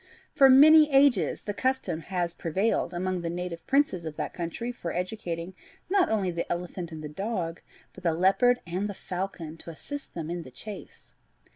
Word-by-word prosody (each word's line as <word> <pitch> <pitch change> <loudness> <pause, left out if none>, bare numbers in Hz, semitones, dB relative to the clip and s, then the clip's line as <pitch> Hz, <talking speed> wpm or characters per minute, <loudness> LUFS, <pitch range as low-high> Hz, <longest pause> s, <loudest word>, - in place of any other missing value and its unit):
For 270 -1 +7
many 300 +3 +8
ages 270 - +3
the 205 - -3
custom 260 -9 -1
has 175 0 -2
prevailed 175 +4 0
among 185 0 -2
the 170 - -3
native 175 -1 -5
princes 270 -11 +2
of 160 -2 -6
that - - -4
country 175 +8 -4
of 245 - -19
educating 180 -2 -4 0.4
not 390 -2 +4
only 200 -5 +1
the 170 0 -4
elephant 175 0 -4
and 155 -1 -7
the - - -4
dog, 175 0 -3 0.3
but - - -13
the 165 -2 +2
leopard 220 +8 +3
and 185 +4 -2
the 200 - -5
falcon 180 -4 -5
to 170 - -8
assist 285 - -7
them 165 -1 -4
in 175 0 -3
the 130 - -10
chase. 200 - -10
180 Hz, 180 wpm, -27 LUFS, 170-230 Hz, 0.4 s, many